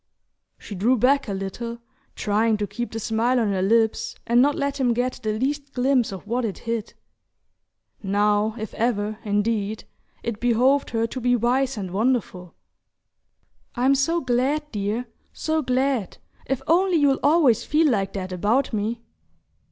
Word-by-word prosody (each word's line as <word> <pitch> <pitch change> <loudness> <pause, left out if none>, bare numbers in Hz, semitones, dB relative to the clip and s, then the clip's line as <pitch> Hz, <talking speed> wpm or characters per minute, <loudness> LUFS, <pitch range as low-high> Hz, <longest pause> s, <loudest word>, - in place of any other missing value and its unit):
She - - -10
drew 225 +7 +2
back 275 +4 +3
a - - -3
little, 230 +5 -5 0.4
trying 215 +1 +1
to 210 - -1
keep 240 +3 -5
the 225 - -4
smile 230 +4 +1
on 220 -3 +1
her 190 -1 0
lips 220 +3 +1
and 240 +1 +4
not 285 +2 +3
let 280 0 -2
him 245 -3 +2
get 250 +2 -1
the 215 -2 -2
least 280 +3 -2
glimpse 255 -3 +2
of 190 -1 -8
what 240 +4 -1
it 210 -4 -3
hid. 230 -2 -4 1.1
Now 210 +2 +1
if 220 0 -6
ever, 215 -2 -1
indeed, 210 0 -1 0.4
it 230 -3 -3
behoved 250 +4 +2
her 225 -1 0
to 255 +3 -5
be 245 +1 +3
wise 250 +2 +1
and 190 -3 -5
wonderful! 200 -5 -1 1.2
"I'm 260 +2 +3
so 330 +5 +1
glad, 270 +4 0
dear; 210 +3 -2 0.3
so 315 0 -1
glad. 255 - 0 0.3
If 270 0 -2
only 355 +2 +3
you'll 285 -3 +3
always 290 -6 +4
feel 310 +2 +2
like 195 -4 -1
that 185 -1 -5
about 220 +9 0
me..." 220 +2 -2
235 Hz, 160 wpm, -23 LUFS, 210-265 Hz, 1.2 s, and